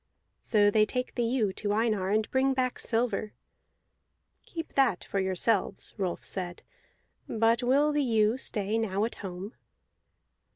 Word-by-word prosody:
So 205 -2 +3
they 215 0 +4
take 250 +2 -3
the 245 - -2
ewe 230 -4 +1
to 205 +1 -2
Einar, 215 -4 +1
and 215 +1 +1
bring 265 0 +2
back 255 -1 -1
silver. 225 -2 -1 1.1
"Keep 325 -1 -7
that 260 -9 +2
for 200 - -2
yourselves," 190 +2 0
Rolf 185 -5 -3
said, 180 -2 -4 0.7
"but 225 +2 +2
will 275 +5 +3
the 295 0 +1
ewe 225 -3 +2
stay 215 -2 0
now 205 -1 0
at 230 - -4
home?" 190 +3 -6
220 Hz, 140 wpm, -29 LUFS, 200-245 Hz, 1.1 s, they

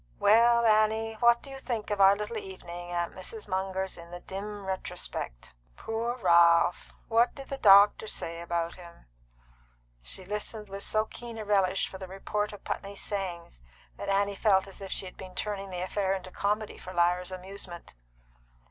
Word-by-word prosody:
"Well, 235 +2 +5
Annie, 220 0 +3
what 235 0 +5
do 275 - -10
you 270 - -7
think 230 -5 -3
of 205 -1 +1
our 195 +1 +8
little 210 +2 -4
evening 175 -3 -8
at 175 -1 -1
Mrs. 210 +4 -7
Munger's 190 -1 -2
in 170 0 -11
the 175 0 -7
dim 200 +2 -6
retrospect? 180 - -5 0.2
Poor 230 +2 -2
Ralph! 170 -3 +4
What 235 +2 +3
did 275 -1 -10
the 275 - -4
doctor 205 0 +7
say 170 -4 -4
about 170 0 -2
him?" 170 -2 -14 1.0
She 180 - -4
listened 210 +1 -4
with 195 +1 -6
so 215 +1 +1
keen 235 +1 -9
a 215 - -5
relish 195 -2 +2
for 190 - -9
the 190 - -7
report 205 +2 -2
of 205 - -11
Putney's 200 0 -4
sayings 175 - -4 0.3
that - - -6
Annie 200 +1 +2
felt 195 -2 +3
as 195 - -11
if 195 - -7
she - - -2
had 185 - -10
been 185 -1 -10
turning 195 0 -3
the 180 -1 -4
affair 190 +1 0
into 185 -1 -7
comedy 210 +2 -1
for 185 - -9
Lyra's 175 +1 +2
amusement. 185 -1 -8
195 Hz, 175 wpm, -29 LUFS, 180-215 Hz, 1.0 s, our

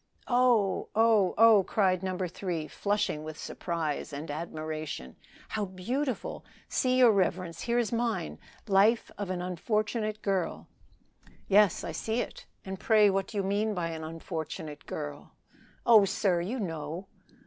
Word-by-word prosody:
"Oh! 245 -5 +3
oh! 220 -4 +4
oh!" 220 -3 +7
cried 185 -2 +1
No. 185 -1 -2
3, 175 -3 -3
flushing 200 -1 -1
with 155 0 -7
surprise 165 -4 -3
and 145 +2 -5
admiration, 155 - -5 0.3
"how 210 -1 -1
beautiful! 235 +8 -3 0.2
See, 255 0 +1
your 250 -3 +7
reverence, 185 -4 0
here 235 0 0
is 235 -3 +1
mine 230 - -1 0.3
'Life 205 +4 +3
of 200 -2 -3
an 180 -1 -2
Unfortunate 215 +4 -1
Girl.'" 190 -4 -1 0.8
"Yes, 200 -2 +4
I - - -4
see 225 +2 -2
it. - - -5 0.2
And 190 -1 -5
pray 215 -3 +5
what 195 0 0
do 215 - -7
you 200 - +1
mean 205 +2 0
by 170 -2 -1
an 160 -1 -5
unfortunate 160 -2 -6
girl?" 75 -1 -6 0.5
"Oh, 220 -4 +7
sir! 190 -2 +1
you 225 +9 -3
know." 165 -1 -4
190 Hz, 145 wpm, -29 LUFS, 165-215 Hz, 0.8 s, oh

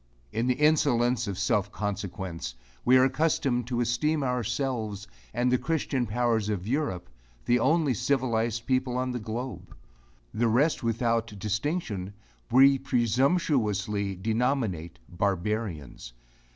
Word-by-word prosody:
In 115 +2 -1
the 125 - +2
insolence 125 -5 +2
of 100 -2 -3
self 105 -1 +1
consequence, 95 - -4 0.3
we 130 +1 +6
are 130 - +6
accustomed 135 -4 +1
to 120 -1 -1
esteem 145 +6 +1
ourselves 120 -4 -2 0.2
and 120 +2 +1
the 125 - +3
Christian 145 -6 -1
powers 115 -1 0
of 100 -2 -3
Europe, 125 - -1 0.4
the 120 +1 +3
only 150 +2 +2
civilized 115 -2 0
people 130 -1 0
on 130 0 -1
the 125 - -3
globe; 115 0 -6 0.6
the 115 +2 +1
rest 135 +8 +2
without 115 -1 0
distinction, 105 - -2 0.4
we 135 +2 +6
presumptuously 120 - +1
denominate 110 - -1
barbarians. 95 - -3
120 Hz, 120 wpm, -27 LUFS, 105-130 Hz, 0.6 s, we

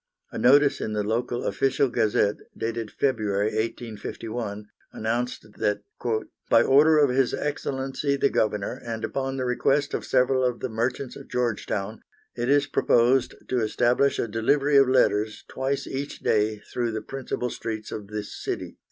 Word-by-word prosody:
A - - -5
notice 140 +2 +5
in 110 - -2
the 105 -1 0
local 120 +3 -1
Official 135 +1 +1
Gazette, 105 -3 +1 0.2
dated 115 -1 -3
February, 105 -6 0
1851, 110 -1 -4 0.3
announced 120 +2 -2
that 105 0 0 0.7
"by - - +6
order 150 +4 +5
of 145 -3 +4
His 130 0 +2
Excellency 135 -1 -2
the 140 0 +2
Governor, 105 +3 -1
and 115 -1 -5
upon 135 0 -3
the 130 - -1
request 135 +3 +1
of - - -2
several 130 0 +2
of 125 -1 0
the 130 - -3
merchants 120 +3 -2
of - - -11
Georgetown, 110 -3 -2 0.3
it 120 +1 -2
is 145 0 +4
proposed 130 -2 +3
to 125 - 0
establish 120 +5 +2
a - - -1
delivery 140 +7 +2
of 135 -2 +6
letters 110 -4 +2
twice 135 +1 -2
each 140 +2 -5
day 105 0 +2
through 120 +3 -3
the 110 - -4
principal 130 -2 -4
streets 110 -2 -5
of 105 -2 -6
this 105 0 -5
city." - - -5
120 Hz, 155 wpm, -25 LUFS, 110-135 Hz, 0.7 s, by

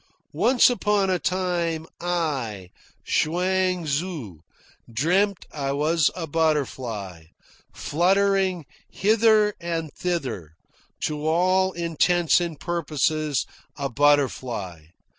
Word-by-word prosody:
"Once 250 -1 +4
upon 210 -5 +1
a 180 - +1
time, 175 -3 -1
I, 135 - -2 0.3
Chuang 180 +2 +1
Tzu, 145 - -3 0.5
dreamt 180 - +1
I 140 -2 -3
was 155 +2 +2
a 175 -3 -4
butterfly, 130 - -2 0.5
fluttering 190 0 +1 0.2
hither 215 0 +3
and 165 -3 -3
thither, 120 - -4 0.5
to 150 0 -2
all 185 +3 +2
intents 170 +1 +2
and 165 -4 -4
purposes 155 -3 -1 0.3
a 140 -1 -2
butterfly. 120 - 0
165 Hz, 90 wpm, -24 LUFS, 140-185 Hz, 0.5 s, Once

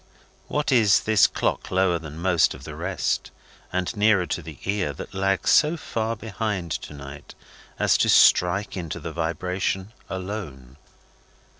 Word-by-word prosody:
What 150 -1 -1
is 110 -6 +5
this 110 -3 +4
clock - - -2
lower 95 -2 +2
than 75 -1 -9
most 85 -1 +2
of - - -13
the - - -8
rest, - - -2 0.4
and 90 +5 -2
nearer 105 -3 +3
to 90 - -3
the 80 -2 -10
ear, 100 -7 -1
that - - -9
lags 95 0 +1
so 155 +2 +4
far 115 -6 -3
behind 105 -5 -4
to 75 - -4
night 70 +1 -10 0.4
as - - +3
to - - +3
strike 95 +3 +4
into 85 -5 -5
the 80 - -6
vibration 90 +5 -2 0.2
alone? 90 - -6
95 Hz, 150 wpm, -24 LUFS, 80-105 Hz, 0.4 s, is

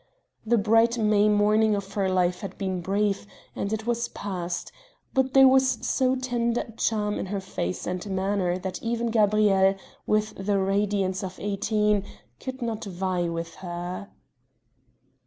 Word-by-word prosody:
The 235 +1 +2
bright 225 +3 +3
May 210 -1 +3
morning 210 +1 +3
of 200 0 -5
her 195 -2 0
life 180 -1 +1
had 195 - -7
been 190 -2 -2
brief 200 +2 0 0.3
and 200 - -3
it 220 0 -2
was 235 0 0
past, 180 -3 -5 0.4
but 265 0 +1
there 270 0 +9
was 265 0 +4
so 260 0 +2
tender 240 -2 0
a 230 - -9
charm 210 -2 -1
in - - -3
her 200 +1 -2
face 90 - -4
and 180 0 -3
manner 190 -1 0
that 185 0 -5
even 235 0 -1
Gabrielle, 205 -3 +4 0.3
with 215 0 +1
the 200 0 +1
radiance 195 -1 0
of 185 -1 -6
eighteen, 210 0 +1 0.4
could 260 -1 -6
not 225 -2 -3
vie 180 -2 -1
with 165 0 -4
her. 175 +2 -6
205 Hz, 155 wpm, -26 LUFS, 190-225 Hz, 0.4 s, there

